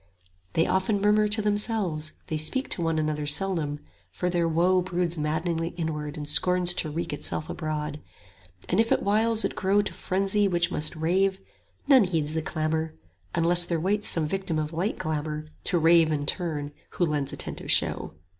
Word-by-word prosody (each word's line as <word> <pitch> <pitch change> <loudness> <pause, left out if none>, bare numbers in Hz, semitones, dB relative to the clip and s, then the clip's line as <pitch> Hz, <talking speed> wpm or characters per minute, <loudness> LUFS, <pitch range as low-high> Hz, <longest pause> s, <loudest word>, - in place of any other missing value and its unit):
They 165 - +2
often 190 +2 0
murmur 210 +1 +3
to 210 +1 +2
themselves, 205 -7 0
they 155 - -3
speak 260 - 0
To - - +1
one 165 -1 0
another 150 -1 -2
seldom, 150 -3 0 0.3
for 180 0 -3
their 170 -1 +1
woe 175 +3 +2
65 - - -7
Broods 175 -1 +1
maddening 165 +2 -2
inwardly 155 -3 -4
and 145 - -6
scorns 180 +3 +4
to 160 - -1
wreak 160 +1 -4
Itself 150 +1 -4
abroad; 150 -2 -4 0.7
and - - 0
if 225 0 +2
at - - +2
whiles 220 +2 +2
it - - -3
grow 195 +2 +2
To - - -4
frenzy 195 +2 +1
which 175 -2 +1
must 150 +2 +2
rave, 190 +4 +1 0.5
none 265 -7 +6
heeds 160 -4 -2
the 160 - -1
clamour, 160 0 -2 0.4
Unless 175 +1 +4
there 170 -2 -1
waits 205 +5 0
some 165 -2 0
victim 185 0 -1
of 155 +1 -3
like 185 +7 -2
glamour, 155 0 -3 0.2
To 175 - +1
rave 165 -1 +4
in 145 -1 -1
turn, 150 -4 -1 0.2
who 175 - +1
lends 150 -3 -2
attentive - - -6
show. - - +1
170 Hz, 180 wpm, -26 LUFS, 155-190 Hz, 0.7 s, none